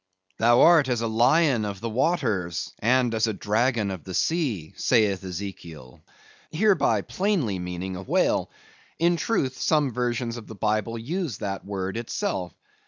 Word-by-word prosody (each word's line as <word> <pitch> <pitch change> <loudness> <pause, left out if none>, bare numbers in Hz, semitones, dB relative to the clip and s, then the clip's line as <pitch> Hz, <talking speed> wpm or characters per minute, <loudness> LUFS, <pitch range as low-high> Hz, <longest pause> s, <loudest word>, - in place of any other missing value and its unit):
"Thou 120 +2 +5
art 160 -6 +6
as 120 -2 0
a 115 - 0
lion 125 +3 +3
of 100 -2 -4
the 115 - -4
waters, 110 - -1
and 125 +1 +2
as 110 0 +1
a 110 - -1
dragon 110 0 0
of 95 -3 -7
the 95 -2 -6
sea," 130 - -1
saith 105 -6 +2
Ezekiel; 85 -8 -8 0.5
hereby, 155 - +2
plainly 175 - -1
meaning 90 +1 -5
a 90 - -6
whale; 95 - +1 0.5
in 170 +1 +3
truth, 135 - -1
some 150 -4 +2
versions 120 -1 -2
of 115 - -10
the 110 - -9
Bible 110 +2 -1
use 150 - -3
that 100 -1 -4
word 95 0 -4
itself. 95 -6 -3
115 Hz, 155 wpm, -25 LUFS, 95-130 Hz, 0.5 s, art